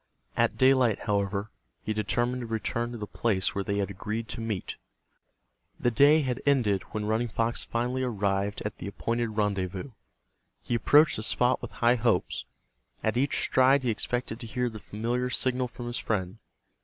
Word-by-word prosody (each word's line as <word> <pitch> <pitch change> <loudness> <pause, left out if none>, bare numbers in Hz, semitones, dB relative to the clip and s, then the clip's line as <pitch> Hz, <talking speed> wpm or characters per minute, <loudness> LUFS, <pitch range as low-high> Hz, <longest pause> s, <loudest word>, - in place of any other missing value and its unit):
At - - +2
daylight, 130 -5 +4
however, 100 0 -1 0.3
he 110 - -1
determined 120 +4 0
to 120 - -5
return 115 +1 -2
to 120 - -6
the 105 - -4
place 100 -3 0
where 100 - -2
they 100 +1 -1
had 100 -1 -1
agreed 110 +4 -4
to 115 - -4
meet. 110 -5 -4 1.0
The 120 - +2
day 145 +6 +5
had 130 -1 -2
ended 120 -9 +2
when 105 -1 -3
Running 110 +3 +1
Fox 115 +1 -1
finally 125 +2 -1
arrived 100 -4 -1
at 105 - -4
the 90 - -5
appointed 115 +2 -2
rendezvous. 100 +2 -1 0.7
He - - -3
approached 145 +7 +5
the - - -3
spot 125 +3 +1
with - - -7
high 120 +1 +5
hopes. 115 -5 0 0.6
At 110 - +1
each 135 +3 +1
stride 130 +1 +4
he 120 - +2
expected 120 +1 -2
to 120 - -7
hear 125 +1 -1
the 110 - -8
familiar 120 +5 -2
signal 125 0 +1
from 120 +1 -9
his 120 0 -3
friend. 95 -1 -2
115 Hz, 175 wpm, -28 LUFS, 105-125 Hz, 1.0 s, day